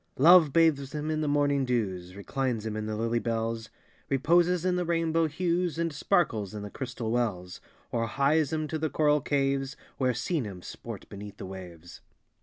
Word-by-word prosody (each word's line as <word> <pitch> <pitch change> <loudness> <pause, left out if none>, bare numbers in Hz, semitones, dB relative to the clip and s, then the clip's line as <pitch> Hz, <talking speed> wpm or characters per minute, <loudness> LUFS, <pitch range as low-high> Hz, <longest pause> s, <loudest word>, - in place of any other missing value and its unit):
Love 160 +1 +7
bathes 150 -3 +2
him 150 +1 -2
in 155 0 -1
the 155 - 0
morning 145 -1 +2
dews, 95 -8 -2
Reclines 115 +2 -2
him 110 -1 -3
in 110 0 -3
the 110 - -2
lily 115 +2 0
bells, 115 -1 -2 0.4
Reposes 170 +6 +3
in 180 -1 +2
the 180 - 0
rainbow 165 -1 +1
hues, 175 +2 -1
And 165 -2 -1
sparkles 140 - 0
in 105 - -5
the 105 - -7
crystal 120 -4 -4
wells, 100 -7 -2 0.3
Or 115 -1 0
hies 140 +4 +2
him 155 -1 -1
to 160 - -2
the 155 0 0
coral 150 -1 +2
caves, 135 -1 0 0.2
Where 130 -2 +2
sea 150 +7 -1
nymphs 95 -6 -7
sport - - -8
beneath 100 0 -9
the - - -7
waves. 90 -3 -10
135 Hz, 185 wpm, -28 LUFS, 110-155 Hz, 0.4 s, Love